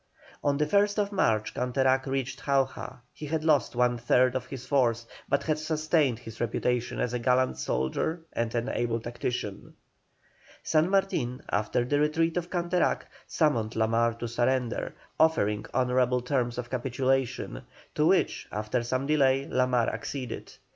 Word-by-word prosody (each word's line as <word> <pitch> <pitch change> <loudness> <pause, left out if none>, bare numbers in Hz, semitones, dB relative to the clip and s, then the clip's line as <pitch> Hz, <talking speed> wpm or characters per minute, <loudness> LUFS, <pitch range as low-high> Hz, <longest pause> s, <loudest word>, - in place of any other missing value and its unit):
On 140 -1 +2
the 150 - +2
1st 205 +4 +2
March 110 - +1
Canterac 130 +1 +1
reached 135 -1 -3
Jauja; 135 -2 0
he 150 - -7
had 160 +1 -1
lost 150 -6 +2
one 120 0 +2
third 125 +2 +3
of 125 -1 -2
his 130 -2 -7
force, 120 -4 +1 0.2
but 140 - +1
had 155 -1 0
sustained 155 -4 +1
his 115 -2 -10
reputation 120 +1 -1
as 125 - -1
a 125 - -1
gallant 125 - +2
soldier 65 - -1
and 115 0 -2
an 120 +1 0
able 115 -1 -1
tactician. 120 -3 -5 0.9
San 160 +2 +2
Martin, 190 -11 0
after 105 +4 0
the 145 +3 +1
retreat 160 +2 +1
of 175 -1 -2
Canterac, 175 0 0 0.2
summoned 120 -9 +1
La 110 - +2
Mar 115 +1 +1
to 120 +1 -5
surrender, 120 +1 -1 0.2
offering 105 -10 +2
honourable 125 -1 +2
terms 125 -2 -1
of 125 0 -5
capitulation, 130 - -1 0.3
to - - +2
which, - - +2
after 105 +4 -1
some 130 +3 -1
delay, 135 -2 +3
La 125 0 +1
Mar 125 -2 +2
acceded. 135 -3 -5
125 Hz, 155 wpm, -28 LUFS, 120-145 Hz, 0.9 s, third